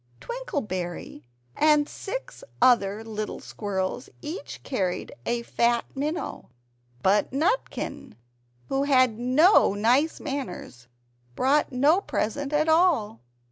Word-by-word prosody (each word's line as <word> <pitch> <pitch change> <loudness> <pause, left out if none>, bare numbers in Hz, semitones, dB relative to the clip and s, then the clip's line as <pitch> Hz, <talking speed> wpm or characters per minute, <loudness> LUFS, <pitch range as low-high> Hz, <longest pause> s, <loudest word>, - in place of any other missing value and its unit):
Twinkleberry 195 - -5 0.3
and 300 -1 +4
six - - -7 0.2
other 220 -4 +3
little 215 -1 -5
squirrels 200 +3 -4
each 310 +5 -7
carried 190 -9 -2
a 235 0 0
fat 235 0 +1
minnow; 300 +6 -4 0.5
but 200 +2 +3
Nutkin, 320 - -2 0.5
who 270 +1 0
had 255 -5 +3
no 255 - +5
nice 250 +10 +2
manners, 230 - -6 0.5
brought 285 +3 +2
no 290 +9 +3
present 280 - -2
at 305 +1 +2
all. 320 - +3
255 Hz, 100 wpm, -26 LUFS, 210-300 Hz, 0.5 s, no